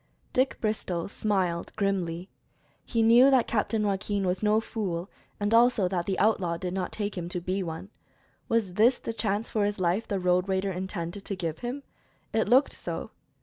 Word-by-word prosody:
Dick 260 +1 +1
Bristol 190 -6 -2
smiled 190 -5 -1
grimly. 185 -4 -1 0.6
He 230 -2 0
knew 240 +4 +7
that 260 -3 +4
Captain 215 -1 0
Joaquin 200 0 -1
was 180 0 0
no 215 0 +3
fool, 195 -6 -4 0.3
and 205 +1 0
also 230 -4 +5
that 175 -2 -2
the 195 - 0
outlaw 190 -5 +2
did 180 0 -4
not 185 -2 -2
take 205 -1 -3
him 175 -2 -4
to 180 - -2
be 185 +3 -2
one. 170 +3 -6 0.6
Was 220 -5 +1
this 230 +6 +4
the 230 - -5
chance 210 0 -1
for 215 - 0
his 205 -1 -1
life 185 +5 +1
the 200 - -1
road 180 +1 +2
raider 190 +1 0
intended 185 0 -4
to 200 - -2
give 165 -3 -3
him? 250 +4 -4 0.5
It 220 -2 +2
looked 260 +4 +5
so. - - -6
200 Hz, 185 wpm, -28 LUFS, 180-220 Hz, 0.6 s, knew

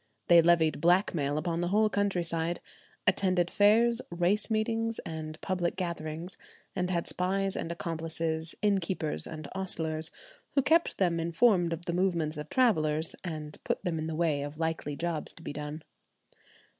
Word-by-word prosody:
They 170 -1 +9
levied 165 -3 +3
blackmail 165 -4 +2
upon 165 +2 -1
the 175 - 0
whole 215 +4 +3
countryside; 175 -5 -1 0.5
attended 185 -2 +2
fairs, 230 +3 +4
race 175 +6 +1
meetings, 225 +1 0
and 155 -1 -6
public 180 -3 -1
gatherings, 170 -1 -4 0.4
and 180 -1 -1
had 170 -2 0
spies 195 +1 -1
and 165 - -3
accomplices, 165 -1 -3
innkeepers 190 -6 +2
and 155 -2 -7
ostlers, 160 -4 -2 0.5
who 275 - +4
kept 330 +4 +3
them 175 -3 +2
informed 170 +1 +3
of 165 +1 -4
the 170 - -2
movements 170 -4 0
of 150 0 -6
travellers, 160 -11 +2
and 155 -4 -6
put - - -2
them 165 -3 -1
in 155 - -3
the 160 - -3
way 155 -3 +1
of 145 +1 -6
likely 160 -2 -2
jobs 165 0 -3
to 165 - -14
be - - -5
done. 150 +1 -6
170 Hz, 155 wpm, -30 LUFS, 160-190 Hz, 0.5 s, They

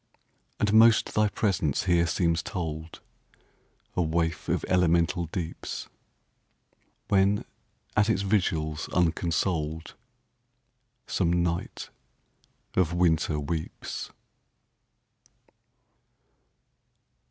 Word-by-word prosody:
And 105 0 +1
most 115 0 +6
thy 105 0 +3
presence 90 - 0
here 85 -2 +3
seems 85 0 +1
told,A 80 -2 -8
waif 80 -1 -1
of - - 0
elemental 85 -1 +2
deeps, 85 0 -5 1.2
When, 100 +1 +2 0.5
at 105 +1 +3
its 100 -3 +1
vigils 80 -6 0
unconsoled, 85 -2 0 1.1
Some 85 -1 +1
night 85 -1 -3 0.8
of 90 -2 +1
winter 80 -3 +2
weeps. 80 +2 -4
85 Hz, 75 wpm, -27 LUFS, 80-95 Hz, 1.2 s, most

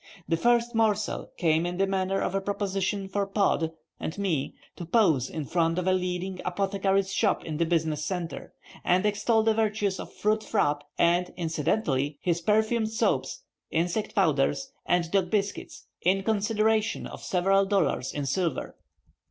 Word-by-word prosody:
The 165 - +2
first 240 +5 +2
morsel 215 -2 0
came 160 -2 +2
in 175 0 -3
the 195 - +3
manner 195 0 0
of - - -1
a 195 - 0
proposition 195 0 -2
for 200 +1 -1
Pod 195 -5 +1 0.3
and 160 - -4
me 175 -9 -1 0.2
to - - -7
pose 165 - +2
in 155 -3 -4
front 165 +2 +1
of 180 - -1
a 185 - +3
leading 180 0 -2
apothecary's 195 +1 0
shop 205 -5 +1
in 155 -2 -4
the 170 0 +1
business 160 -3 0
center, 175 0 -4 0.3
and 180 +2 +2
extol 215 +2 +2
the 220 0 +3
virtues 210 -3 0
of - - -7
fruit 215 +1 0
frappe, 145 -8 0
and 175 +1 +2
incidentally 150 -3 0
his 170 -1 0
perfumed 220 +3 +2
soaps, 225 - -1 0.3
insect 175 +8 -1
powders, 145 -7 +1 0.2
and 175 -2 +1
dog 190 -3 +2
biscuits, 200 0 -2 0.2
in 195 +2 +2
consideration 220 +1 +1
of - - -8
several 195 0 +2
dollars 195 -9 +1
in 145 -1 -3
silver. 170 0 -1
190 Hz, 160 wpm, -27 LUFS, 170-210 Hz, 0.3 s, the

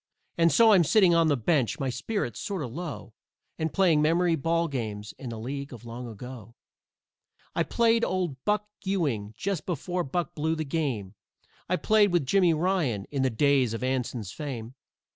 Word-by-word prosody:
And 165 0 +4
so 230 -1 +6
I'm 190 -4 +6
sitting 185 +2 +5
on 165 -1 +4
the 145 -2 +2
bench, 140 +2 +1
my 135 -2 -1
spirits 125 - -3
sort 195 -6 -3
o' - - -3
low, 145 -3 -7 0.5
And 160 -1 -1
playing 175 -6 +3
memory 165 +2 +3
ball 165 +3 0
games 110 -7 -4
in 130 - -6
the 115 - -6
League 140 +5 -5
of 120 -2 -10
Long 120 +1 -7
Ago. 115 0 -10 1.0
I - - 0
played 230 -1 +2
with - - +1
Old 175 -8 -2
Buck 210 0 0 0.2
Ewing 140 - -1
just 195 -5 -3
before 180 +1 -2
Buck 165 +2 -2
blew 160 +2 -1
the 155 -1 -3
game, 135 - -2 0.6
I 180 - +3
played 210 +1 +3
with 175 -5 +2
Jimmy 180 +4 +4
Ryan 155 - 0
in 140 -2 -1
the 130 - +2
days 130 -1 +2
of 115 - -5
Anson's 125 -5 -2
fame. 130 -6 -6
150 Hz, 180 wpm, -27 LUFS, 125-175 Hz, 1.0 s, so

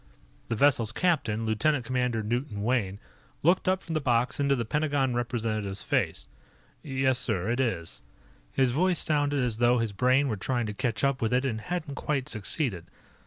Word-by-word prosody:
The 115 - 0
vessel's 120 -3 +3
captain, 120 -9 0
Lieutenant 120 +5 +1
Commander 125 -2 0
Newton 115 -1 -2
Wayne, 110 -5 0 0.5
looked 175 +5 +3
up 185 0 +1
from 165 - -5
the 155 - 0
box 120 0 +1
into 140 -1 +3
the 120 -3 -2
Pentagon 145 -1 0
representative's 110 -4 -2
face. - - 0 0.6
"Yes, 130 -2 0
sir, 110 -6 -1
it 120 - -1
is." 110 -11 -2 0.5
His 130 -2 +2
voice 180 +6 +2
sounded 145 -3 +1
as 115 -3 -1
though 120 +1 +4
his 115 -3 -1
brain 130 +6 +3
were 110 -5 -2
trying 120 +4 -1
to 105 - -4
catch 115 -2 -2
up 140 -1 +1
with 110 - 0
it 125 +2 +2
and 110 -4 -2
hadn't 165 0 -4
quite 140 -1 -2
succeeded. 105 - -1
125 Hz, 175 wpm, -28 LUFS, 110-140 Hz, 0.6 s, though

